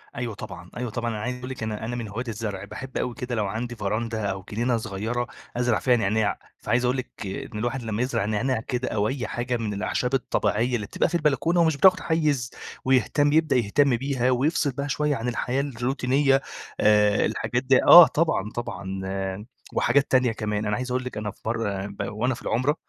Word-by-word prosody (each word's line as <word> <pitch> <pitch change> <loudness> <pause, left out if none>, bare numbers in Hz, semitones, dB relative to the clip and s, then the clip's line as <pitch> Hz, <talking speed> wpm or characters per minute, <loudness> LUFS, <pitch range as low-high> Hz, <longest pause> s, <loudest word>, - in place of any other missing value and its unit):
أيوة 120 -2 -3
طبعًا، 90 -2 -9
أيوه 125 0 -3
طبعًا. 120 +2 -2
أنا 105 -2 -4
عايز 125 +2 -3
أقول 125 +1 -7
لِك 130 -3 -6
أنا 110 0 -3
أنا 120 +2 -3
من 115 -2 -4
هواة 110 +4 -4
الزرع. 105 -3 -4
باحب 130 0 -7
أوي 125 - -1
كده 125 -1 -4
لو 105 -2 0
عندي 120 +4 -4
فراندة 110 +1 -2
أو 95 0 -6
جنينة 120 +3 +1
صغيرة 110 +3 -3 0.3
أزرع 120 -3 +2
فيها 125 -2 +3
نعناع. 110 -1 +1 0.2
فعايز 125 +1 +1
أقول 125 +2 +1
لِك 130 - -5
إن 100 +2 -5
الواحد 120 +3 -2
لمّا 110 0 -2
يزرع 125 -6 0
نعناع 110 +4 0
كده، 125 +2 -3
أو 105 -1 0
أي 125 -2 -3
حاجة 120 +1 -2
من 110 -3 -3
الأعشاب 125 +5 -1
الطبيعية 125 -2 +1
اللي 105 -4 -3
بتبقى - - 0
في - - -3
البلكونة 160 +2 +2
ومش 160 -3 +2
بتاخد 185 +5 +6
حيّز 150 -7 0 0.4
ويهتم 145 +3 +3
يبدأ 160 -2 +3
يهتم 125 +3 +3
بيها، 130 -1 0
ويفصل 140 +3 +1
بها 140 +2 -4
شوية 150 +1 0
عن 115 0 -4
الحياة 125 +2 -1
الروتينية 135 +1 +1 0.4
آآ 105 -1 +4
الحاجات 120 +2 -1
دي 130 0 +4
آه. 175 -2 +11
طبعًا، 145 - 0
طبعًا 95 -5 -5 0.7
وحاجات 140 0 +2
تانية 130 -2 +4
كمان. 105 -1 -2
أنا 105 0 0
عايز 125 +2 -4
أقول 130 +1 0
لِك 125 - -6
أنا 105 -1 -3
في - - -25
مرّة 105 -4 -2
ب 100 0 -6
وأنا 120 +5 0
في - - -12
العُمرة، 130 +6 +1
120 Hz, 200 wpm, -25 LUFS, 110-130 Hz, 0.7 s, آه